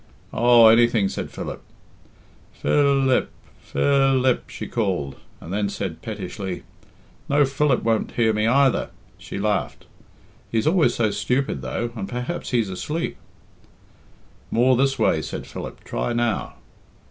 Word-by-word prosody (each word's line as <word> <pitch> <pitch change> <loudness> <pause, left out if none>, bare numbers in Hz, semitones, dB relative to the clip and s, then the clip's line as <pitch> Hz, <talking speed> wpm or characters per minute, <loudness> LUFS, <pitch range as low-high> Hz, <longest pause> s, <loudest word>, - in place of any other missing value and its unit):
"Oh, 120 -1 +6
anything," 115 -3 +4
said - - -5
Philip. - - -6 0.9
"Phil 140 -2 +2
ip! - - +2 0.3
Phil 135 -2 +2
ip!" 130 -2 +1
she - - -6
called, 90 - -2 0.2
and 85 - -8
then 100 0 0
said 90 -4 -5
pettishly, 95 -3 -5 0.7
"No, 145 0 +4
Philip 140 -1 +1
won't 115 -1 0
hear 110 -2 +2
me 105 +1 +1
either." 135 +2 +3 0.3
She - - -7
laughed. 100 -11 -2 0.7
"He's 115 +2 0
always 155 -7 +3
so 110 -3 +1
stupid 125 - -1
though, 110 - -3
and 100 -4 -5
perhaps 125 +8 -4
he's 115 -6 0
asleep." 150 - -3 1.3
"More 125 +2 +3
this 135 +2 +1
way," 110 -8 +2
said - - -6
Philip. - - -8
"Try 120 - -2
now." 120 -3 -1
120 Hz, 135 wpm, -23 LUFS, 105-135 Hz, 1.3 s, Oh